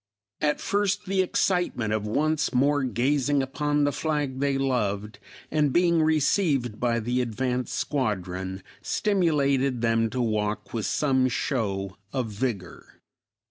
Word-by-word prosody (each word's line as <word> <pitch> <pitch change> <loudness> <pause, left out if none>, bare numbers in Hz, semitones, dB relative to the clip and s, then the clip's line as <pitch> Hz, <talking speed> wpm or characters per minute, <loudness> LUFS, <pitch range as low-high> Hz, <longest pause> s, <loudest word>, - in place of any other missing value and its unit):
At 150 -1 +1
first 200 -1 0
the 190 0 +1
excitement 180 - 0
of 105 -1 -1
once 150 +4 0
more 145 +3 +3
gazing 135 +3 +1
upon 145 +2 0
the 145 - +2
flag 145 -4 -2
they 140 -1 +1
loved, 105 -6 -1 0.3
and 150 -2 +2
being 170 +1 +3
received 150 - +1
by 120 -1 +1
the 120 +3 0
advanced 125 +1 -2
squadron, 95 - -2 0.2
stimulated 140 - +1
them 115 -1 +2
to 125 - -4
walk 110 -3 -1
with 115 -3 -1
some 130 -3 +2
show 100 -8 -2
of 130 -4 -2
vigor. 105 -4 -5
130 Hz, 130 wpm, -26 LUFS, 110-150 Hz, 0.3 s, more